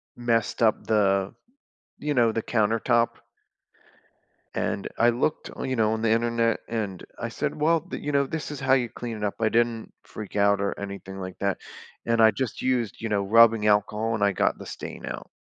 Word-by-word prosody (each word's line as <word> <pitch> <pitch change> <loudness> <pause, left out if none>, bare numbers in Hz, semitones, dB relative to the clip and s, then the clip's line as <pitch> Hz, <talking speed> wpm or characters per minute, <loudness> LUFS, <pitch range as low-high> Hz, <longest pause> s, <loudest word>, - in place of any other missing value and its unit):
messed 115 -2 0
up 110 -1 +2
the 100 -3 +2 0.7
you 150 0 -1
know, 120 -3 +4
the 115 - -2
countertop 115 +1 +1 1.4
and 100 - -2
I 120 - +5
looked 130 +6 -1
on - - -5
you 130 - 0
know, 110 -2 +2
on 110 - -2
the 115 -1 +2
Internet, 115 0 +1
and 105 -5 -3 0.2
I - - -2
said, - - -2
"Well, 165 +2 +3
the" 180 - -7
you 145 - -3
know, 140 0 +3
"this 160 +1 -4
is 145 -2 -6
how 135 0 +3
you 125 -3 +1
clean 115 -1 -6
it 105 - -6
up." 100 - -2
I 110 - +3
didn't 115 -1 0
freak 105 -1 -8
out 100 0 +3
or 100 - -2
anything 100 -1 -7
like 95 -1 -7
that, 100 -1 0 0.5
and 115 -1 +2
I 110 0 +7
just 125 +1 -4
used, 125 -5 -1
you 115 - -3
know, 100 -2 +1
rubbing 115 +1 +5
alcohol, 105 +2 +2
and 105 - -1
I 100 - +4
got 95 - +1
the - - -10
stain - - -7
out. - - -6
115 Hz, 200 wpm, -26 LUFS, 105-120 Hz, 1.4 s, I